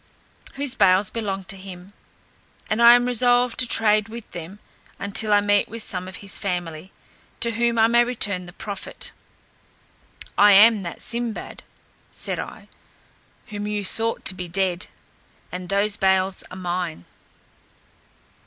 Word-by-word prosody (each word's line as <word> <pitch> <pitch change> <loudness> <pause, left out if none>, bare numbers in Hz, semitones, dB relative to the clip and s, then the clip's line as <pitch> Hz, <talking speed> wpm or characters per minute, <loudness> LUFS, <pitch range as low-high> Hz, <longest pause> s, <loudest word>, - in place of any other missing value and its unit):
Those 280 -2 0
bales 190 -4 +3
belonged 195 -4 -4
to 200 - 0
him, 190 0 -11 0.8
and 215 +2 +1
I 235 +1 +9
am 245 0 +2
resolved 245 0 +2
to 250 - +3
trade 215 -2 +2
with 230 0 -9
them 170 +4 -8 0.4
until 200 +2 -2
I 205 0 +5
meet 205 0 +2
with 230 0 -5
some 185 -1 -3
of 185 - -8
his 195 - -2
family, 175 -2 -4 0.5
to 235 - 0
whom 235 +1 0
I 225 - +6
may 235 +1 +4
return 205 -7 0
the - - -10
profit. 200 0 -4 1.3
"I 205 0 +8
am 215 +1 +7
that 170 -2 -7
Sinbad," 235 -1 -4 0.5
said - - -4
I, - - -8 0.8
"whom 205 -1 -5
you 210 -1 -2
thought 225 +4 -2
to - - +7
be 180 -1 -6
dead, 180 0 -1 0.6
and 180 0 -7
those 200 +1 +1
bales 190 -1 +2
are 185 - -9
mine." 175 - -4
205 Hz, 145 wpm, -23 LUFS, 185-230 Hz, 1.3 s, I